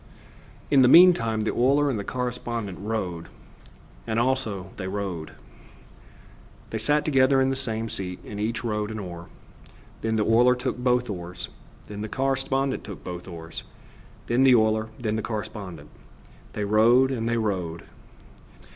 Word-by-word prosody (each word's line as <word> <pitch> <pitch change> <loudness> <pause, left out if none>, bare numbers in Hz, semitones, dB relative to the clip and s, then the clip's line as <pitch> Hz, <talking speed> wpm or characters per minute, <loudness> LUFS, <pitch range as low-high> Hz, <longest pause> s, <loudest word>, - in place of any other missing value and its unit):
In 140 -2 +6
the 125 - +6
meantime 125 -9 +6
the 110 - -1
oiler 140 +4 +3
and 125 -6 -1
the - - -3
correspondent 120 -5 -4
rowed 95 -6 -3 0.8
And 110 - -1
also 115 -7 -1
they 95 - -4
rowed. 95 -5 -4 1.4
They 110 - -2
sat 150 +7 +1
together 135 -2 +4
in 135 0 +2
the - - -1
same 115 -3 -2
seat, 95 -5 -4
and 105 - -7
each 115 +4 -2
rowed 105 -2 -2
an 110 - -5
oar. 85 -4 -7 0.7
Then 110 0 0
the 105 -1 +1
oiler 120 +3 +5
took 125 0 -3
both 125 -1 +2
oars; 90 -3 -6 0.4
then 105 0 -7
the 110 - -4
correspondent 135 +1 0
took 100 - -9
both 90 0 -7
oars; 80 -2 -7 0.6
then 120 +2 +1
the 130 -2 +7
oiler; 110 -1 +2
then 110 -2 -2
the - - -1
correspondent. 105 -4 -6 0.6
They 105 - -2
rowed 120 +6 +4
and 115 -3 -2
they 120 - +1
rowed. 90 -7 -2
110 Hz, 155 wpm, -25 LUFS, 100-125 Hz, 1.4 s, the